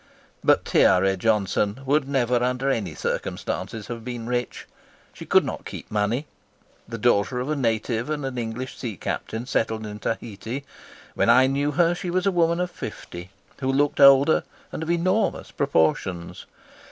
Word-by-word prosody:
But - - +4
Tiare 95 +1 +4
Johnson 105 +2 0
would 140 0 +2
never 125 -3 +1
under 125 +2 0
any 100 - -2
circumstances 110 -2 -3
have 115 -1 -7
been 120 -1 -5
rich. 120 0 -3 0.5
She - - -10
could - - +4
not - - -5
keep - - -9
money. 105 +7 0 0.6
The 115 - -5
daughter 120 +1 +2
of 130 +4 -2
a - - +1
native 115 0 -1
and 150 -2 -2
an 135 -1 -4
English 120 +2 -5
sea 115 -7 -5
captain 110 +7 -4
settled 110 -3 -1
in 105 0 -7
Tahiti, 115 +5 -4 0.5
when - - +1
I 125 +2 +7
knew 140 +2 0
her 170 +3 +3
she 175 +1 -5
was 180 +1 0
a 195 - +3
woman 170 -1 +2
of 180 0 -1
fifty, 85 - -8 0.3
who 135 -1 0
looked 145 +2 +1
older, 140 +2 +7 0.3
and - - -5
of 160 - -4
enormous 185 +5 0
proportions. 85 - 0
125 Hz, 165 wpm, -24 LUFS, 110-140 Hz, 0.6 s, I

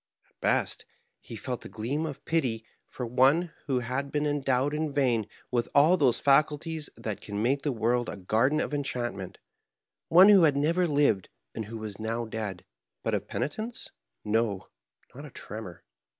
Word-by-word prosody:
At - - -39
best, - - 0 0.3
he - - -10
felt 125 +3 -5
a - - -9
gleam 135 +9 -2
of 145 - -8
pity 125 -9 0 0.2
for 125 - -5
one 135 +8 +3
who 130 -3 +1
had 130 +4 -3
been 150 0 0
endowed 140 -1 +1
in 155 0 -1
vain 125 -7 +1 0.2
with 120 -2 0
all 155 +6 +6
those 135 -8 +3
faculties 150 +2 +2
that 110 -3 -5
can 100 -1 -5
make 130 +6 +1
the 145 - -1
world 120 +1 0
a - - -6
garden 115 +10 +1
of - - -2
enchantment, 120 -9 -3 0.7
one 185 +5 +8
who 200 -3 +8
had 150 -4 +4
never 170 +5 +2
lived 140 - +2 0.2
and 110 - -4
who 115 +2 -7
was 110 -2 -7
now 115 +2 -2
dead. 105 -5 -5 0.4
But - - -1
of - - -1
peni 145 - -2
tence, 225 +2 -6 0.4
no, 105 -3 0 0.4
not - - -9
a - - -9
tremor. - - -8
130 Hz, 175 wpm, -28 LUFS, 115-150 Hz, 0.7 s, one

